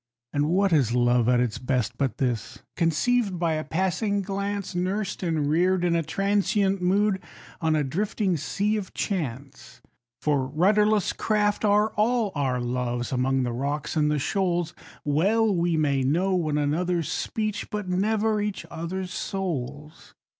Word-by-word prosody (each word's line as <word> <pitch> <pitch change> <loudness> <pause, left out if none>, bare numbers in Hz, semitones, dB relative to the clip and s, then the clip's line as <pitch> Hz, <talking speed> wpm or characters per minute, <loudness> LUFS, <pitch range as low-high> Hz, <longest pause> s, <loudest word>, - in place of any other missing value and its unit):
And 145 +1 +1
what 190 +1 +2
is 125 -6 +3
love 120 -1 +3
at 125 -1 +4
its 120 -3 -1
best, 125 -4 -1
but 135 -5 -1
this? 120 -5 -2
Conceived 185 +5 +1
by 170 -2 +1
a 155 0 -2
passing 190 +5 0
glance, 200 0 -3
Nursed 190 +3 -2
and 160 -5 0
reared 180 +4 +2
in 170 -1 +2
a 165 - +2
transient 195 +3 +1
mood, 195 +2 +2 0.4
on 160 -1 +2
a 150 - +2
drifting 190 - -1
Sea 205 +8 -1
of 195 -3 -6
Chance. 140 - -4 0.4
For 140 -4 +1
rudderless 205 +7 +2
craft 210 -1 0
are 210 +1 +4
all 220 0 +1
our 135 -4 0
loves, 120 0 -2
among 130 +1 +1
the 120 -1 -2
rocks 140 +6 -3
and 150 -1 +2
the 150 - +1
shoals, 175 +1 0 0.3
Well 200 +9 +2
we 170 -1 +1
may 140 -3 +2
know 170 +9 +1
one 155 -5 0
another's 165 +3 0
speech, 215 -2 -2
but 210 -2 -4
never 210 +3 +1
each 205 -4 -3
other's 180 +3 -4
souls. 150 - -5
175 Hz, 155 wpm, -26 LUFS, 145-200 Hz, 0.4 s, at